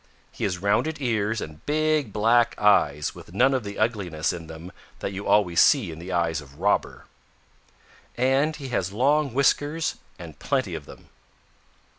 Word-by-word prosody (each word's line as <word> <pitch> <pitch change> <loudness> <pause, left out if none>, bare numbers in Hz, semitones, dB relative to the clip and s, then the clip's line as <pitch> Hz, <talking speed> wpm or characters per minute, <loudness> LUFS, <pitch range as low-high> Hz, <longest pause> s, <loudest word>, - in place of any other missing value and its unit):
He - - -4
has 90 -2 -1
rounded 100 +12 0
ears 110 -4 -1
and 75 0 -9
big 155 -4 +1
black 115 +3 +2
eyes 75 -8 +3
with 85 - -13
none 130 +6 +4
of 130 -3 0
the 100 -1 -7
ugliness 100 -9 -1
in 85 -2 -8
them 80 +3 -10 0.3
that 100 - -5
you 100 +1 -6
always 90 -5 +4
see 120 - +4
in 80 - -9
the 90 +3 -7
eyes 85 -3 0
of 70 +1 -16
Robber. 100 +3 0 1.1
And 135 +5 +2
he 140 -3 -8
has 95 -6 -1
long 140 +6 +2
whiskers 145 +4 +1 0.2
and - - -11
plenty - - -1
of - - -6
them." - - -14
105 Hz, 165 wpm, -25 LUFS, 90-135 Hz, 1.1 s, none